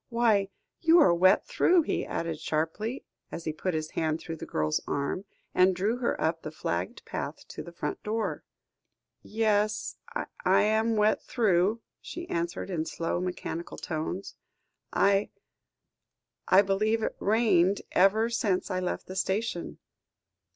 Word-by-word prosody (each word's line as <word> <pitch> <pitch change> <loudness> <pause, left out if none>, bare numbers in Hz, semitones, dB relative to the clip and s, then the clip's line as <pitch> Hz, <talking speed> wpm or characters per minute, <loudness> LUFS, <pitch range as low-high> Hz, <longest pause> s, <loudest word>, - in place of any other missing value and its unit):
Why, 225 -5 +2 0.3
you 335 +1 +6
are 180 - +6
wet 185 +3 +4
through," 365 -8 +3
he - - -2
added 165 -2 -3
sharply, 165 - -2 0.3
as 170 - -6
he 155 - -1
put 175 +2 -2
his 155 0 -3
hand 160 0 -1
through 165 -1 -6
the - - -8
girl's 75 0 0
arm, 140 +7 -2 0.3
and 185 0 +4
drew 205 +6 0
her 245 -1 -1
up 165 +1 0
the - - -5
flagged 90 - -4
path - - -5
to - - -6
the 170 - -9
front 170 - -4
door. 220 +1 -2 0.8
"Yes, 215 -1 0 0.5
I'm 220 +2 +3
wet 210 0 +3
through," 210 -1 +2 0.2
she 345 0 -7
answered 170 +3 -2
in 165 -3 -1
slow, 165 +1 -2
mechanical 175 -2 -4
tones. 165 +4 -4 0.6
"I 200 0 +3 1.2
I 190 +2 +6
believe 215 +3 +1
it - - 0
has - - -34
rained 205 -3 +3
ever 205 +5 +4
since 200 -4 0
I 185 - 0
left 180 -1 -3
the 185 - -8
station." 190 -1 -2
195 Hz, 145 wpm, -28 LUFS, 170-220 Hz, 1.2 s, you